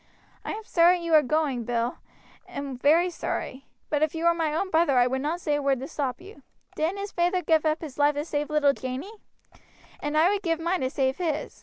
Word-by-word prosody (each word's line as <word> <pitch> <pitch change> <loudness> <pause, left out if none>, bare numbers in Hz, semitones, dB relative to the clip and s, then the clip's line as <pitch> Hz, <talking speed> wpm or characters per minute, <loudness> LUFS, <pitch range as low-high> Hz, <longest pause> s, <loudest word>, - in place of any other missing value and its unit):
I - - -4
am 440 +1 -6
sorry 350 -2 +4
you 335 -1 -3
are 310 - +8
going, 280 -3 0
Bill, 235 +1 -2 0.5
very 285 +6 +1
sorry; 270 -5 -5 0.2
but 295 -1 +1
if 310 +1 +1
you 325 +1 -2
were 340 - +5
my 325 -2 -1
own 375 +5 -2
brother 320 -5 +3
I 245 - +5
would 265 +1 -1
not 320 +5 -2
say 300 - 0
a 290 - 0
word 275 -2 +1
to 265 - -6
stop 265 -6 -3
you. 400 +4 -14 0.3
Didn't 330 +6 -1
his 400 0 -5
feyther 355 +1 0
give 320 -1 +2
up 310 +1 0
his 295 -4 -8
life 290 0 +4
to 295 +1 -2
save 295 -2 -2
little 300 -2 +3
Janey? 260 +11 -6 0.9
and 295 +1 -2
I 335 +5 +5
would 410 -1 -1
give 330 -4 -1
mine 345 +3 -1
to 260 - 0
save 265 -1 0
his. 320 -4 -3
310 Hz, 225 wpm, -26 LUFS, 275-340 Hz, 0.9 s, are